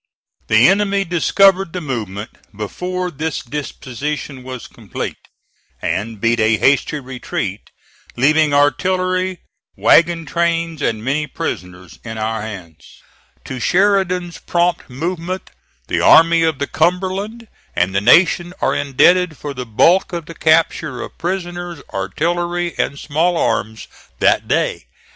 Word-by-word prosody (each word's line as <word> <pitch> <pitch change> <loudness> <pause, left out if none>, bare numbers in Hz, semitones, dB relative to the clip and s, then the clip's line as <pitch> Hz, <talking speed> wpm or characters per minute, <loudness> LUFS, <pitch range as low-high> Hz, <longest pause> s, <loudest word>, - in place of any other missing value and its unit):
The 110 +2 +6
enemy 200 +1 +2
discovered 190 +1 +3
the 180 - -3
movement 110 - -5 0.3
before 180 - -3
these 155 0 -3
dispositions 140 0 -5
were 130 0 -6
complete, - - -7 0.5
and 105 +3 -3
beat 115 +2 +1
a 110 0 +3
hasty 140 +4 +2
retreat, 130 -2 -5 0.5
leaving 150 +4 +3
artillery, 185 +5 +1 0.4
wagon 170 0 +4
trains, 165 0 -1
and 110 -3 -1
many 150 +3 0
prisoners 90 - -6
in 110 -1 -6
our 110 0 -2
hands. 90 -7 -10 0.4
To 130 - -6
Sheridan's 180 - +1
prompt 175 -2 0
movement 170 +7 -4 0.3
the - - -1
Army 165 +1 +6
of 160 -3 +1
the 140 - -1
Cumberland, 190 +8 -1 0.3
and 95 +1 +1
the 100 - +1
nation, 175 - +4
are - - +1
indebted 160 +4 +3
for 145 -1 -6
the 125 -1 -6
bulk 175 - +3
of 170 -2 -4
the 165 - -9
capture 155 -4 +1
of - - -10
prisoners, 175 -2 -4
artillery, 175 - -1
and 140 - -1
small 165 +5 0
arms 110 -7 -1 0.3
that - - +2
day. - - 0
160 Hz, 125 wpm, -18 LUFS, 125-175 Hz, 0.5 s, The